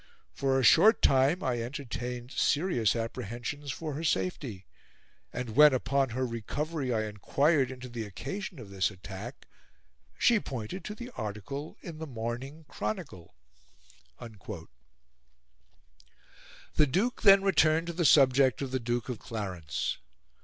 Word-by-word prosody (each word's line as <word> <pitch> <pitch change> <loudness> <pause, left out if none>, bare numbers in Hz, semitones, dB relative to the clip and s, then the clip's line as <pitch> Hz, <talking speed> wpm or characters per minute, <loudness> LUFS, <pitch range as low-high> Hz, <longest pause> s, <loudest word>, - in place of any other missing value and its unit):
For 135 -1 +1
a - - 0
short 215 - +6
time 140 +7 +4
I 120 -2 0
entertained 125 -1 -5
serious 145 - +2
apprehensions 120 +5 -4
for 155 +3 -5
her 155 +4 -4
safety; 95 - -2 0.7
and 120 -3 -5
when, 150 -1 +8
upon 135 +1 +1
her 130 +3 -1
recovery, 130 +5 -3
I 110 -2 +1
enquired 135 - +1
into 130 -1 -8
the 120 -2 -5
occasion 190 - -6
of 110 -6 -10
this 95 -1 +1
attack, 105 +5 -9 0.7
she 230 -2 +4
pointed 135 - -6
to 210 - -5
the 240 +3 -8
article 110 - -6
in 165 -3 -8
the 160 - -5
Morning 130 +5 -5
Chronicle." 95 - -5 0.8
The 115 -3 -10 2.5
Duke 210 - 0
then 195 -2 +7
returned 160 -3 +3
to 170 - -4
the 170 +1 -1
subject 135 -2 +5
of 135 - -4
the 130 - 0
Duke 120 -1 -2
of 125 -5 -4
Clarence. 95 - -4
130 Hz, 130 wpm, -30 LUFS, 115-150 Hz, 2.5 s, when